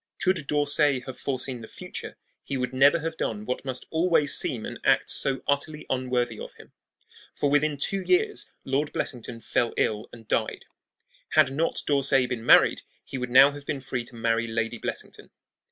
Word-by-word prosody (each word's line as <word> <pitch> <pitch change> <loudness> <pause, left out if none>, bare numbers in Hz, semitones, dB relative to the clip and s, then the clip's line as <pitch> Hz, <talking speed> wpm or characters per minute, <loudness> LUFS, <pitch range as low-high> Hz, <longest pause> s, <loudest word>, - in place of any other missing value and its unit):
Could 185 -6 +1
D'Orsay 145 -2 +2
have 130 0 -8
foreseen 130 -2 -3
the 110 - -9
future - - -8 0.3
he 140 - -3
would 125 0 -3
never 140 +5 +5
have 160 0 -4
done 105 -1 -3
what 125 - -3
must 130 -2 -5
always 160 -3 +3
seem 115 -3 +1
an - - -7
act - - +3
so 135 -2 +1
utterly 150 +2 -1
unworthy 125 -3 -1
of - - -9
him. - - -16 0.6
For 145 - 0
within 145 0 +2
two 195 +7 -1
years 420 - +1 0.2
Lord 140 +3 -1
Blessington 115 -2 -4
fell 120 0 -1
ill 105 0 0
and 115 -2 -14
died. - - -1 0.7
Had 130 - +5
not 155 +5 -1
D'Orsay 135 -2 +3
been 120 -2 -4
married - - +5 0.2
he 135 - -6
would 125 0 -3
now 135 +3 +7
have 145 0 -11
been 140 - -2
free 125 -2 -4
to 120 - -11
marry 115 0 0
Lady 115 +1 -2
Blessington. - - -6
135 Hz, 180 wpm, -26 LUFS, 120-145 Hz, 0.7 s, now